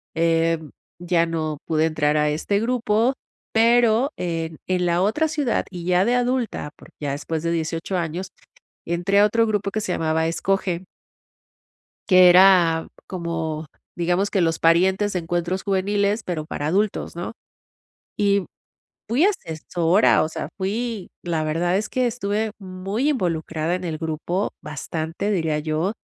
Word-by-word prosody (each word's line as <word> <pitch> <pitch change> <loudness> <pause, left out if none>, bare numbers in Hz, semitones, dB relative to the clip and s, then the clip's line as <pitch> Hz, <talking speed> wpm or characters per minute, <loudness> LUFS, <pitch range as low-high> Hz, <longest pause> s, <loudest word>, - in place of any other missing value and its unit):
em, 165 -1 +1 0.3
ya 175 -1 +2
no 155 -2 -2
pude 160 0 +1
entrar 155 -1 +1
a 150 0 +2
este 200 +7 0
grupo, 235 +1 +1 0.4
pero, 235 +3 +4
en 165 -2 -3
en 180 -1 +1
la 175 +1 +2
otra 265 +11 +2
ciudad, 295 -6 0
y 175 -2 -7
ya 180 +1 +3
de 240 - +2
adulta, 245 -10 -1
porque - - -17
ya 145 -1 -2
después 155 +2 -3
de 170 - 0
18 165 +3 -2
años, 175 +3 -3 0.6
entré 175 +4 +1
a 205 - +7
otro 225 +1 +2
grupo, 205 -2 -1
que 215 - -2
se 185 - -2
llamaba 160 0 0
Escoge. 185 +1 -1 1.2
Que 185 -1 +8
era 175 -3 +6 0.2
como, 165 -3 -4 0.3
digamos, 175 +4 +1
que 195 - +1
los 165 -1 +1
parientes 190 +5 +3
de 180 - -1
Encuentros 175 +2 -2
Juveniles, 200 +2 0
pero 160 -4 -3
para 145 -1 -4
adultos, 200 +2 0
¿no? 175 - -4 0.9
Y 200 -2 +2 0.6
fui 260 +10 +3
asesora, 170 - +2
o 155 - -1
sea 155 -2 -5
fui 210 +1 -3
la 165 -3 -1
verdad 175 +4 0
es 215 +1 -1
que 255 -1 0
estuve 215 -2 -1
muy 195 +8 -2
involucrada 165 - -1
en 180 0 -4
el 160 -2 -3
grupo, 165 +4 -2
bastante, 160 +6 -4
diría 160 -6 0
yo. 155 +6 -1
180 Hz, 150 wpm, -23 LUFS, 165-205 Hz, 1.2 s, Que